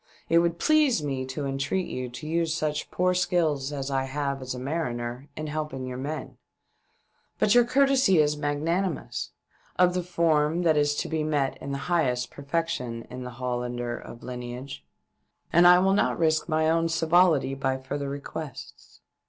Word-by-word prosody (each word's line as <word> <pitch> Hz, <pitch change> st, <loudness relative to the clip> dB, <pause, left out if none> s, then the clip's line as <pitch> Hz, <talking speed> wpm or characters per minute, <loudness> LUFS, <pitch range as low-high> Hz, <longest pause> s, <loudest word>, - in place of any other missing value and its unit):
It 165 Hz, -, +5 dB
would 170 Hz, 0 st, +1 dB
please 300 Hz, -, +3 dB
me 135 Hz, -3 st, -2 dB
to 140 Hz, +2 st, -4 dB
entreat 140 Hz, +7 st, -1 dB
you 125 Hz, -1 st, -4 dB
to 130 Hz, +5 st, -8 dB
use 165 Hz, 0 st, 0 dB
such 155 Hz, -2 st, -2 dB
poor 180 Hz, 0 st, +1 dB
skill 175 Hz, -3 st, +2 dB
as 140 Hz, 0 st, -4 dB
I 135 Hz, -1 st, 0 dB
have 140 Hz, 0 st, -3 dB
as 130 Hz, 0 st, -4 dB
a -, -, -6 dB
mariner 125 Hz, -2 st, -3 dB
in 155 Hz, -, -4 dB
helping 150 Hz, -3 st, -4 dB
your 125 Hz, 0 st, -5 dB
men; 150 Hz, +4 st, -5 dB, 1.0 s
but 205 Hz, -, +3 dB
your 245 Hz, -1 st, +6 dB
courtesy 270 Hz, -6 st, +4 dB
is 150 Hz, -1 st, +3 dB
magnanimous 160 Hz, +5 st, -2 dB, 0.3 s
— -, -, -34 dB
of 180 Hz, 0 st, +4 dB
the 180 Hz, -, 0 dB
form 165 Hz, -1 st, +1 dB
that 160 Hz, -2 st, +4 dB
is 145 Hz, 0 st, +2 dB
to -, -, -2 dB
be 160 Hz, -1 st, -1 dB
met 145 Hz, -3 st, 0 dB
in 140 Hz, 0 st, -4 dB
highest 135 Hz, -5 st, 0 dB
perfection 140 Hz, -6 st, -3 dB
in 125 Hz, +1 st, -6 dB
the -, -, -5 dB
Hollander 120 Hz, -1 st, -3 dB
of 120 Hz, -, -10 dB
lineage 125 Hz, +2 st, -7 dB, 0.3 s
— -, -, -38 dB
and 175 Hz, +1 st, +7 dB
I 180 Hz, 0 st, +9 dB
will 190 Hz, +2 st, +3 dB
not 200 Hz, -, +2 dB
risk 160 Hz, 0 st, +1 dB
my 155 Hz, 0 st, +2 dB
own 165 Hz, +1 st, +2 dB
civility 165 Hz, -4 st, +3 dB
by 135 Hz, -1 st, -1 dB
further 140 Hz, +1 st, -4 dB
requests." 140 Hz, 0 st, -8 dB
150 Hz, 175 wpm, -26 LUFS, 135-170 Hz, 1.0 s, I